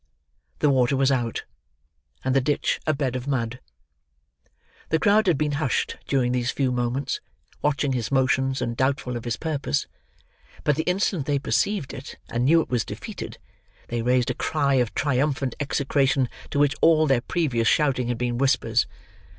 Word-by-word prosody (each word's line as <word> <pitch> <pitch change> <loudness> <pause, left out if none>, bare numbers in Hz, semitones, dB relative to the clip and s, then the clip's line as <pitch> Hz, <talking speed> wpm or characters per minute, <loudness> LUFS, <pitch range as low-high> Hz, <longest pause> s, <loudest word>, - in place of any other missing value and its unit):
The 145 - +3
water 130 0 +2
was 135 0 +3
out, 120 -4 -1 0.8
and 130 0 0
the 135 - +4
ditch 145 +3 0
a 155 - +3
bed 135 -3 -1
of 130 +1 -4
mud. 125 -3 -1 1.3
The 160 - +3
crowd 205 +4 +3
had 170 -5 +4
been 150 0 0
hushed 130 - 0
during 130 -3 +1
these 125 -1 0
few 135 -2 0
moments, 125 +2 -1 0.4
watching 145 -2 +1
his 120 -2 -2
motions 135 0 +2
and 115 - -2
doubtful 130 -1 0
of 120 - -5
his 120 0 -2
purpose, 145 - -1 0.8
but 150 - +2
the 160 - 0
instant 180 -5 0
they 145 -1 +2
perceived 170 +3 0
it 135 - -9
and 120 +1 0
knew 165 +4 +5
it - - -6
was 120 -4 +1
defeated, - - -7 0.5
they 120 -1 -1
raised 125 +1 +2
a - - -2
cry 145 -3 0
of 125 -3 +1
triumphant 140 -2 0
execration 135 -2 +1 0.2
to - - -3
which 145 0 +4
all 160 -1 +5
their 135 -5 +2
previous 120 -7 0
shouting 135 -5 +2
had 120 -1 -1
been 120 0 -1
whispers. 120 -4 +2
135 Hz, 170 wpm, -24 LUFS, 125-145 Hz, 1.3 s, knew